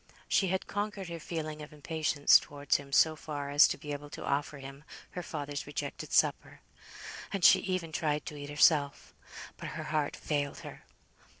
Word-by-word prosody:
She 195 - +2
had 190 +1 -1
conquered 205 -2 -4
her 170 0 -6
feeling 155 -2 -5
of 150 - -9
impatience 150 -1 +3
towards 145 -1 -1
him 140 -1 -11
so 155 +3 +5
far 145 -2 -5
as 145 +1 +7
to - - -3
be 150 - -7
able 145 0 -6
to - - -8
offer 145 +1 -1
him 135 +1 -10 0.3
her 180 - -5
father's 145 -4 -5
rejected 145 - -5
supper; - - +1 0.7
and 195 -3 0
she - - +8
even 185 -4 -3
tried 150 -1 -1
to 150 - -6
eat 145 0 -7
herself. 145 -1 +3 0.4
But - - -6
her - - -4
heart 150 -2 0
failed 145 -2 -2
her. - - -11
150 Hz, 180 wpm, -31 LUFS, 145-165 Hz, 0.7 s, she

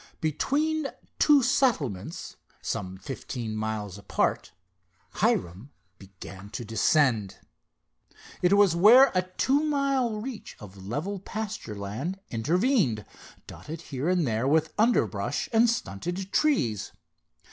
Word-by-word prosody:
Between 290 - 0 0.3
two 290 -3 +5
settlements, 160 - 0 0.3
some 95 0 -4
fifteen 115 +1 -6
miles 110 -2 -4
apart, 100 - -1 0.7
Hiram 90 +9 0 0.3
began 95 0 -11
to 120 - -6
descend. 115 -2 +2 1.0
It 180 +2 +3
was 200 -4 +5
where 235 +10 +7
a 185 - +3
two 220 +10 0
mile 275 -7 0
reach 235 0 -7
of 95 -2 -11
level 175 - -3
pasture 215 - -5
land 110 - -4
intervened, 150 - +1 0.4
dotted 155 +2 -9
here 135 +6 -1
and 180 -3 +2
there 115 +1 0
with 155 +2 +2
underbrush 235 +3 +1
and 230 +1 +5
stunted 190 - -3
trees. 125 - +1
160 Hz, 110 wpm, -27 LUFS, -, 1.0 s, where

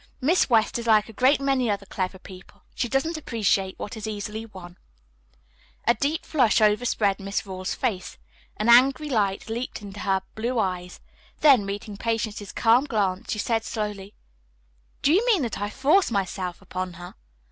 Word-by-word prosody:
Miss 305 +6 +2
West 225 0 +2
is 235 - -6
like 215 -1 +4
a - - -10
great 260 +6 +3
many 270 -3 +1
other 200 -1 -2
clever 190 -1 -3
people, 185 0 -14
she 245 - -2
doesn't 315 +6 0
appreciate 205 -8 0
what 205 - -6
is 220 -1 -6
easily 215 +1 -5
won." 180 -4 -12 1.1
A 235 - +5
deep 295 +5 -2
flush 250 -8 +3
overspread 210 -2 +2
Miss 200 +2 -3
Rawle's 185 -1 -4
face. 215 -9 -3 0.4
An 215 - -1
angry 260 +5 +5
light 200 -5 0
leaped 235 +3 -4
into 200 0 -9
her 190 -1 0
blue 235 +3 -2
eyes. 180 -4 -2 0.4
Then, 260 -9 +6
meeting 200 +1 -5
Patience's 215 -2 -3
calm 235 +4 +3
glance, 200 -7 -1
she - - -1
said 225 +1 0
slowly, 210 -4 -5 0.9
"Do 290 - +4
you 395 +6 +4
mean 405 - +3
that 225 -4 -4
I 205 - -1
force 300 - +3
myself 185 -4 -3
upon 185 -1 -5
her?" 175 +1 -10
215 Hz, 170 wpm, -25 LUFS, 195-245 Hz, 1.1 s, Then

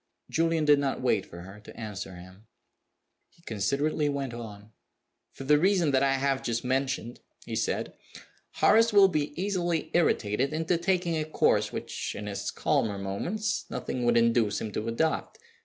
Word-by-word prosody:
Julian 165 -1 +1
did 145 -1 +5
not 140 -1 -1
wait 125 -6 +1
for 85 - -10
her 95 +3 -11
to 105 - -13
answer 100 -4 -6
him. 95 +4 -14 0.8
He 170 - -28
considerately 140 - 0
went 140 -3 -3
on. 110 -3 -9 0.6
"For - - -9
the 150 +2 +4
reason 180 -3 +3
that 130 -1 +3
I 135 -1 +3
have 135 0 0
just 115 -1 -2
mentioned," 130 -2 -1 0.3
he - - -5
said, - - -2 0.6
"Horace 225 +2 +4
will 200 -2 +7
be 150 -2 -2
easily 175 -4 -1
irritated 135 -5 +1
into 165 +2 0
taking 175 -2 0
a - - 0
course 155 - +1
which, - - -5
in 105 - -6
his 100 -1 -4
calmer 105 -3 0
moments, 165 - -3
nothing 125 - -4
would 120 0 +4
induce 115 -2 +2
him 110 - -5
to 110 +2 -4
adopt. 155 +8 -1
135 Hz, 165 wpm, -28 LUFS, 110-160 Hz, 0.8 s, will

